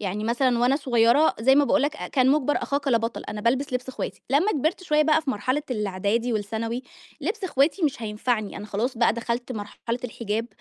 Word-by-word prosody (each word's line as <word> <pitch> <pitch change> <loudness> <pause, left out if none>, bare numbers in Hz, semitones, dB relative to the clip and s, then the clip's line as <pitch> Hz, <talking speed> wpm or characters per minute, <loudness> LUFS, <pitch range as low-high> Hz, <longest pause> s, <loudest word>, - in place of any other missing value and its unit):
يعني 205 +1 -3
مثلًا 240 +1 +2
وأنا 250 +3 +3
صغيرة 250 +1 +3
زي 265 +4 +5
ما 290 0 +5
باقول 275 - +2
لك 300 +1 -1
أ - - -6
كان 260 -1 +3
مُجبَر 290 -1 +2
أخاك 280 0 -1
لا 235 -3 +4
بَطَل، 230 +1 -4
أنا 210 0 -4
بالبس 255 +4 0
لِبْس 250 +1 -2
إخواتي. 260 - -5
لمّا 330 +10 +3
كبرت 315 +5 -1
شوية 305 -4 +3
بقى 315 +1 +3
في 275 - -1
مرحلة 255 +7 -1
الإعدادي 210 +2 -1
والثانوي، 225 +3 -3 0.4
لِبْس 395 +7 -3
إخواتي 315 +2 +1
مش 280 -6 0
هينفعني، 215 0 -2
أنا 210 - -7
خلاص 230 +5 -2
بقى 235 - +4
دخلت 235 +2 -3
مرحلة 225 +2 -5
الحِجاب، 225 -1 -3
245 Hz, 205 wpm, -25 LUFS, 225-285 Hz, 0.4 s, زي